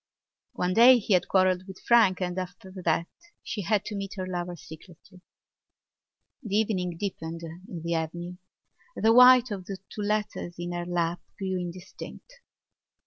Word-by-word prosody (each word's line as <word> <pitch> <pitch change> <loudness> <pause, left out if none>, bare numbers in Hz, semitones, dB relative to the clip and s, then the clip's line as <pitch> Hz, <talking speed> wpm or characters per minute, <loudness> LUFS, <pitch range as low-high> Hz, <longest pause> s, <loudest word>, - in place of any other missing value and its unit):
One 180 0 -1
day 245 +5 +8
he 210 -2 0
had 180 - +3
quarrelled 185 -1 +2
with 190 -1 -10
Frank 220 -6 +4
and 180 -1 -2
after 185 +1 -8
that 170 - +2 0.4
she 210 - -4
had 205 +2 0
to 215 - -5
meet 200 +1 -5
her 185 -2 -4
lover 175 -1 -4
secretly. 175 +3 -14 1.2
The 210 -6 -3
evening 185 -5 0
deepened 165 -4 -5
in 165 +1 -9
the 170 0 -1
avenue. 170 +2 -4 0.6
The 225 +1 +3
white 250 0 +8
of 190 -3 -5
two 195 +2 -7
letters 210 -4 -2
in 175 0 -4
her 175 0 -4
lap 175 -1 -1 0.2
grew 190 -2 -2
indistinct. 180 - -9
185 Hz, 150 wpm, -27 LUFS, 175-205 Hz, 1.2 s, day